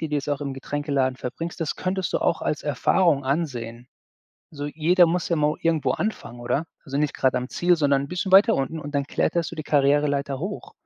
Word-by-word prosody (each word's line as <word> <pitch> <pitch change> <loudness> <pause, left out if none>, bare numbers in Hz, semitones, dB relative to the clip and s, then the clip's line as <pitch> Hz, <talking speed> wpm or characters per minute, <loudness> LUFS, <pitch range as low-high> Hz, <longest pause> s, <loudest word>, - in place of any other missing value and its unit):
die 160 - -3
du 150 - -2
jetzt 145 0 -4
auch 145 - -1
im 140 -2 -4
Getränkeladen 140 -1 -1
verbringst, 165 +8 -6
das 160 - -2
könntest 185 0 -2
du - - +3
auch - - 0
als 150 - -2
Erfahrung 145 +1 +2
ansehen. 125 -5 -3 0.6
So, 145 -2 -5
jeder 170 +4 +4
muss 170 +1 -1
ja 170 - +2
mal 150 0 +2
irgendwo 165 -2 +1
anfangen, 195 - -4
oder? 130 +6 -1 0.2
Also, 140 -2 -3
nicht 150 -1 0
grade 130 -1 +2
am 125 +1 -4
Ziel, 175 0 +2
sondern 140 -3 +2
'n - - -6
bisschen 180 +4 -3
weiter 205 +4 +7
unten, 135 +4 -2
und 145 -1 -7
dann 140 -1 0
kletterst 170 +2 -1
du 170 - -7
die 155 - -5
Karriereleiter 140 -1 +1
hoch. 205 - -6
145 Hz, 215 wpm, -24 LUFS, 140-170 Hz, 0.6 s, weiter